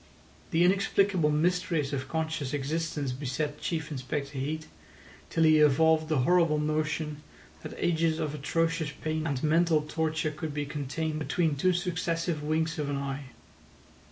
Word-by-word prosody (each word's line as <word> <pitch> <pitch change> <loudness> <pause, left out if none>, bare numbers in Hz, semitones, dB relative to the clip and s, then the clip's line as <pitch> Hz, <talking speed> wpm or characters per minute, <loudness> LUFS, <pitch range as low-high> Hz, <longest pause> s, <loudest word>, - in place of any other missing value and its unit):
The 165 +2 +3
inexplicable 195 -2 +3
mysteries 165 -2 +1
of 135 -1 -3
conscious 155 -3 -2
existence 145 -1 -2
beset 145 +3 -3
Chief 160 -2 -3
Inspector 140 +1 -3
Heat 155 +4 -3 0.6
till 165 - +1
he 155 -1 +6
evolved 155 +2 +4
a 155 - +3
horrible 170 -3 +4
notion 150 0 -1 0.4
that - - -8
ages 165 -1 +1
of 155 -2 -2
atrocious 165 +2 0
pain 155 0 -1
and 140 -2 -2
mental 160 0 +3
torture 155 0 -1
could 150 -1 -5
be 145 -1 -1
contained 150 +2 -3
between 160 +1 +1
two 185 +7 +2
successive 170 -2 -1
winks 160 +2 -1
of 145 -1 -1
an 140 - -1
eye. 140 0 -4
155 Hz, 145 wpm, -29 LUFS, 145-165 Hz, 0.6 s, he